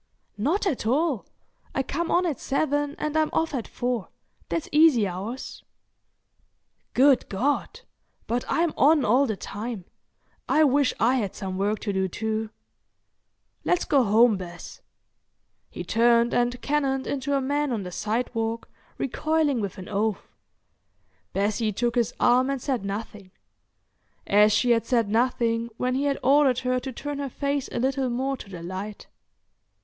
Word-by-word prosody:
"Not 320 - +1
at 280 - -1
all. 280 - +1 0.5
I 270 - +1
come 330 +5 -3
on 360 +1 +3
at 305 -8 -2
seven 290 +1 -1
and 305 0 -3
I'm 315 -1 +2
off 320 -1 0
at 245 -5 -3
four. 245 -4 -2 0.4
That's 330 - -2
easy 295 -8 +5
hours." 200 +8 -6 1.3
"Good 270 0 +4
God!—but 260 - -3
I'm 335 -1 +1
on 295 -1 +5
all 255 +6 +4
the 215 -3 -2
time. 210 -2 -6 0.6
I 310 - +5
wish 285 -1 +3
I 245 +4 +3
had 205 -6 -2
some 190 -2 -5
work 205 +3 0
to 205 - -2
do 190 0 +1
too. 220 +3 -3 1.1
Let's 355 - +1
go 275 -3 +3
home, 220 0 +4
Bess." 175 -2 -9 0.9
He - - -6
turned 235 0 +3
and 245 0 +1
cannoned 270 -2 0
into 280 0 -1
a - - +2
man 285 +1 0
on 220 -4 -2
the 180 - -7
sidewalk, 225 +2 -2 0.3
recoiling 300 -1 0
with 200 -3 -4
an 185 - -8
oath. 210 0 -2 1.0
Bessie 215 +2 0
took 235 +4 -1
his 240 -1 +1
arm 255 +2 +4
and 275 -1 -1
said 255 -4 -2
nothing—as 205 0 -3
she 245 +3 +3
had 230 -1 +2
said 230 -4 +2
nothing 230 0 +1
when 255 0 0
he 270 +2 0
had 280 -1 +1
ordered 275 -1 +4
her 255 0 0
to 265 +1 -6
turn 290 +3 -5
her 280 -1 -3
face 280 +1 -2
a - - -4
little 265 +1 0
more 265 +3 -1
to 205 - -11
the 175 -3 -8
light. 190 +4 -6
245 Hz, 155 wpm, -25 LUFS, 215-280 Hz, 1.3 s, easy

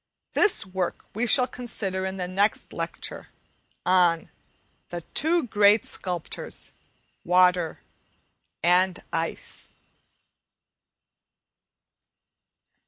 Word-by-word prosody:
This 420 - +3
work 185 -2 -3
we 230 +4 -1
shall 250 +2 +5
consider 200 -7 -4
in 190 0 -5
the 180 -1 -3
next 195 +4 0
lecture, - - -5 0.6
on 175 -3 +3 0.6
"The 175 0 -5
two 330 +2 +3
great 210 -2 +4
Sculptors 180 -3 -5 0.5
Water 180 -2 +3 0.8
and 180 +1 +3
Ice." 165 0 -3
185 Hz, 80 wpm, -26 LUFS, 180-215 Hz, 0.8 s, shall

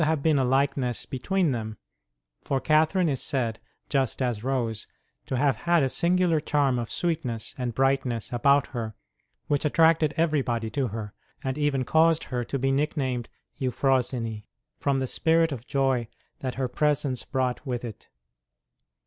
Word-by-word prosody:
ROSE 155 - +3
OF - - +2
LIMA 155 - -2
been 155 -3 +3
a - - +2
likeness 135 -1 +1
between 175 +5 0
them; 110 -3 -4 0.7
for 135 - 0
Catherine 155 +5 +3
is 135 -4 0
said, 115 -5 -1 0.3
just 135 -4 0
as 120 -5 -1
Rose, 120 -5 -1 0.4
to 130 - -1
have 135 -3 +2
had 170 +3 +2
a 135 - +1
singular 175 +1 +2
charm 145 -4 +1
of 115 - -4
sweetness 150 -10 -2
and 125 -3 -3
brightness 135 -4 0
about 140 +3 +4
her 110 -3 -4 0.5
which 145 -1 0
attracted 160 0 +3
everybody 130 -9 0
to 130 +2 0
her, 105 -1 -6 0.3
and 130 -1 -1
even 145 -3 0
caused 160 +3 +4
her 125 -2 -3
to 135 - -3
be 135 +1 +1
nicknamed 135 -4 -1 0.3
Euphrosyne, 125 -4 0 0.4
from 140 -1 +1
the 130 - 0
spirit 165 +4 +2
of 125 -3 -6
joy 135 -4 +1 0.3
that 130 -2 -4
her 130 +1 -1
presence 145 -1 0
brought 130 -1 -1
with 125 -1 -2
it. 110 -3 -9
135 Hz, 160 wpm, -26 LUFS, 120-150 Hz, 0.7 s, about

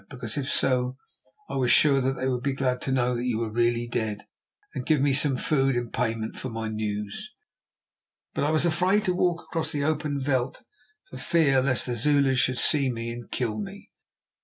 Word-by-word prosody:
Because 125 -5 -5
if 140 -1 -2
so, 125 0 +1 0.5
I - - -4
was 125 -2 +1
sure 140 0 +5
that 130 +1 +1
they 130 0 -3
would 125 -2 -1
be 140 +1 -1
glad 130 -2 -1
to 135 - -2
know 125 -1 +1
that 120 - -3
you 120 -3 0
were 115 -1 -2
really 120 +1 +1
dead, 110 -3 -3 0.5
and 130 - -4
give 155 +2 +2
me 140 0 +2
some 140 -1 +2
food 135 -1 +1
in 120 -1 -2
payment 115 -2 -2
for 130 - -5
my 115 -1 -4
news. 105 -1 -4 1.0
But - - -1
I 145 - +2
was 155 +1 +2
afraid 185 +5 +2
to 180 - +2
walk 175 -1 0
across 160 -1 -3
the 145 -2 -1
open 150 -1 -1
veld 130 -1 0 0.5
for - - -7
fear 145 -6 +3
lest 130 -1 +2
the 125 - -2
Zulus 135 +1 +3
should 130 0 +1
see 140 -1 +3
me 115 0 -4
and 120 0 -8
kill 110 -4 -2
me. 105 - -8
130 Hz, 205 wpm, -26 LUFS, 120-145 Hz, 1.0 s, sure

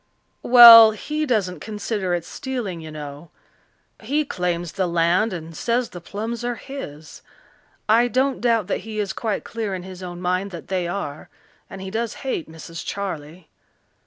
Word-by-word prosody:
"Well, 230 -2 +10
he 300 +8 -3
doesn't 190 - 0
consider 205 -2 -3
it 170 -1 -4
stealing, 240 - -5
you 160 - -9
know. 150 +1 -9 0.7
He 290 +7 0
claims 175 - -2
the 190 -2 -1
land 175 +6 +2
and 165 -2 -7
says 240 +5 -1
the 175 - -9
plums 220 +6 -5
are 245 0 -2
his. 160 - -9 0.7
I 230 +3 +4
don't 260 +3 0
doubt 230 -4 +2
that 200 - -2
he 220 -1 -8
is 205 -2 -2
quite 220 -3 -3
clear 220 -4 -4
in 180 - -7
his 185 0 -10
own 175 -1 -7
mind 185 +2 -1
that 170 -4 -10
they 185 -2 -1
are. 165 -5 -5 0.4
And 195 - -9
he 190 0 -6
does 230 +1 -2
hate 170 -12 -3
Mrs. 165 +1 -9
Charley. 170 -4 -6
195 Hz, 165 wpm, -22 LUFS, 175-230 Hz, 0.7 s, Well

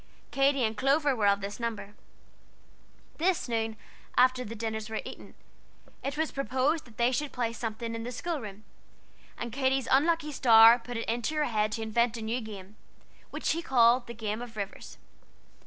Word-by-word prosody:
Katy 275 -1 +2
and 220 0 0
Clover 275 +3 +2
were 210 -3 +1
of 200 0 +3
this 200 +3 -6
number. 225 -3 -4 1.3
This 355 -1 +1
noon, 225 -2 -2 0.4
after 255 0 +4
the 230 -1 -7
dinners 220 -1 -4
were 220 - -4
eaten, - - -10 0.7
it 280 +2 -3
was 315 0 0
proposed 275 +3 0
that 230 -4 -18
they 240 +1 +3
should 280 +3 -2
play 235 -2 -2
something 230 0 -4
in 230 - -4
the 245 - -5
school 325 +6 -3
room, 210 -1 -9 0.7
and 235 0 -5
Katy's 265 -1 0
unlucky 305 +2 +2
star 230 -3 +7
put 245 0 -7
it 230 - -4
into 240 +7 -1
her 300 -1 +1
head 215 -3 0
to 225 - -3
invent 235 +1 +1
a 225 - -6
new 230 +3 -2
game, 205 -2 -10 0.5
which - - -7
she 335 - +1
called 245 -4 +4
the 235 - -8
Game 215 0 -3
of 235 -2 -9
Rivers. 200 -1 -6
235 Hz, 180 wpm, -29 LUFS, 220-270 Hz, 1.3 s, star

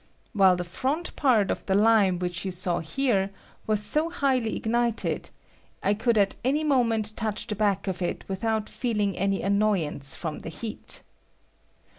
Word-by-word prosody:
While 190 -4 +5
the 180 - -3
front 270 - -2
part 230 -9 +3
of - - -3
the 190 - +2
lime 205 -3 +4
which 175 0 -3
you 190 - -2
saw 180 -1 -1
here 200 - 0 0.4
was 215 -1 +1
so 305 +9 +1
highly 265 -9 0
ignited, 235 0 -1 0.5
I 200 - +3
could 225 +2 +1
at 200 -1 +3
any 285 +5 +1
moment 230 -7 +1
touch 215 -2 -2
the 215 - -3
back 200 -1 0
of 185 -1 -3
it 175 - -2
without 215 +3 -1
feeUng 210 -6 -1
any 195 +1 0
annoyance 195 -9 +1
from 160 -3 -4
the - - -7
heat. 215 +7 -6
210 Hz, 160 wpm, -26 LUFS, 190-235 Hz, 0.5 s, While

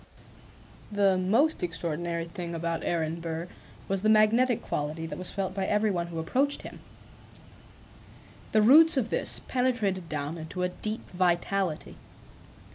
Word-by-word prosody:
The 200 -2 +3
most 220 +13 +2
extraordinary 170 0 -3
thing 170 0 -6
about 165 0 -3
Aaron 165 -1 -1
Burr 165 +1 -4 0.4
was 195 -1 -1
the 215 - +2
magnetic 220 +3 +4
quality 150 +2 -3
that 165 - -6
was 185 - -4
felt 195 -1 -3
by 195 -1 -2
every 210 0 +2
one 175 -2 -2
who 170 -1 -7
approached 265 - 0
him. - - -10 1.7
The 215 - +4
roots 310 +7 +7
of 230 -4 0
this - - +2
penetrated 220 -9 0
down 150 +2 -4
into 160 +3 -5
a 180 - +1
deep 215 +4 -5
vitality. 180 -1 0
185 Hz, 140 wpm, -28 LUFS, 165-215 Hz, 1.7 s, roots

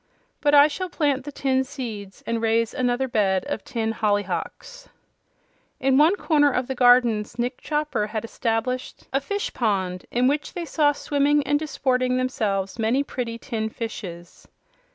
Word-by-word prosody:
But 290 0 +4
I 290 +1 +8
shall 365 +5 -4
plant 285 -6 0
the 290 - -5
tin 265 -1 +1
seeds 230 -8 -7
and 230 -1 -1
raise 225 0 +1
another 250 +1 0
bed 195 -6 +1
of 290 - -4
tin 230 -6 -2
hollyhocks." 215 - -3 0.9
In 265 0 +2
one 310 +7 +5
corner 300 -6 +3
of 250 0 0
the 265 - -3
gardens 245 -3 +4
Nick 245 +1 -2
Chopper 300 -8 -1
had 215 +1 -4
established 230 +2 -3
a 270 - +2
fish 405 +8 -3
pond 190 -6 -1
in 245 +1 +1
which 290 +2 -1
they 350 -2 -4
saw 300 -2 +3
swimming 290 0 +1
and 290 0 +2
disporting 255 -4 0
themselves 215 -6 -1
many 230 +5 +2
pretty 240 -4 -4
tin 225 -3 -3
fishes. 180 -7 -8
250 Hz, 155 wpm, -24 LUFS, 220-290 Hz, 0.9 s, I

